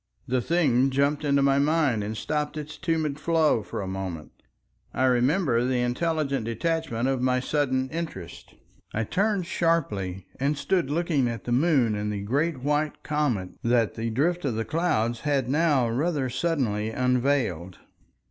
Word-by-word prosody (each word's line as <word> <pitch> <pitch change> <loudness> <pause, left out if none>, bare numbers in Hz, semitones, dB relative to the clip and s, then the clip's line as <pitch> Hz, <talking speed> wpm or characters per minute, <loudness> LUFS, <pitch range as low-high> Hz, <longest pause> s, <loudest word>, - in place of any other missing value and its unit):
The 125 0 +1
thing 135 -4 +2
jumped 140 +3 +1
into 140 -1 +2
my 140 0 +3
mind 145 -7 +2
and 105 +1 -4
stopped 150 +5 -2
its 150 0 -6
tumid 155 -2 -1
flow 160 -7 +2
for 105 - -5
a - - -5
moment. 95 -5 -5 0.6
I 130 - +1
remember 130 +1 +2
the 125 -1 +1
intelligent 140 0 -1
detachment 130 -1 -1
of 135 -2 0
my 125 0 +2
sudden 130 -1 0
interest. 155 - -7 0.4
I 110 - +1
turned 195 - 0
sharply, 105 - -1
and 140 +2 0
stood 140 +1 0
looking 155 -4 +1
at 115 -1 -4
the 120 - -4
moon 130 -4 +3
and 105 0 -2
the 100 -1 -4
great 140 +6 0
white 150 +2 -1
comet, 135 -12 -1
that 115 -2 +2
the 115 0 -3
drift 170 +10 0
of 130 -6 -1
the 115 0 -2
clouds 120 -9 0
had 140 -3 0
now 145 -3 +2
rather 135 +2 -1
suddenly 125 -8 0
unveiled. 125 - 0
135 Hz, 155 wpm, -26 LUFS, 115-155 Hz, 0.6 s, my